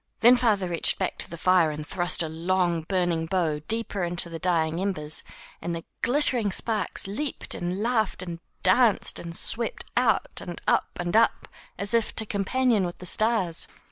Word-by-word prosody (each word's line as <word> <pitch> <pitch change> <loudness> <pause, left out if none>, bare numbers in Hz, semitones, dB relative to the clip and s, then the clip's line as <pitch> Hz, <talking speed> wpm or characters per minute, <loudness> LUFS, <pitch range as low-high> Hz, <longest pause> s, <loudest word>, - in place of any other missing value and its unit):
Then 240 +2 +8
father 215 -6 +1
reached 170 -1 +2
back - - -2
to - - +3
the 170 - -7
fire 180 -1 +4
and 150 0 -5
thrust 175 +1 +1
a - - -2
long, 170 +1 0
burning 170 -2 -1
bough 165 -4 0
deeper 225 -4 -2
into 175 0 -2
the 165 - -6
dying 165 -1 0
embers, 160 -6 -3 0.4
and 170 0 -3
the 165 - -6 0.2
glittering 245 -5 +2
sparks 215 0 -1
leaped 250 +9 -2
and 180 +4 -3
laughed 220 -6 0
and 170 -2 -6 0.2
danced 210 +3 +3
and 170 -1 -7
swept 230 +4 -1
out 240 -4 +1
and 175 -2 -7
up - - +1
and 175 +2 -2
up 230 +1 +3 0.3
as 200 +2 +1
if 230 -2 +1
to 220 - +4
companion 215 +2 +1
with 175 -1 -4
the 180 - -10
stars. 215 -4 0
185 Hz, 175 wpm, -26 LUFS, 170-220 Hz, 0.4 s, Then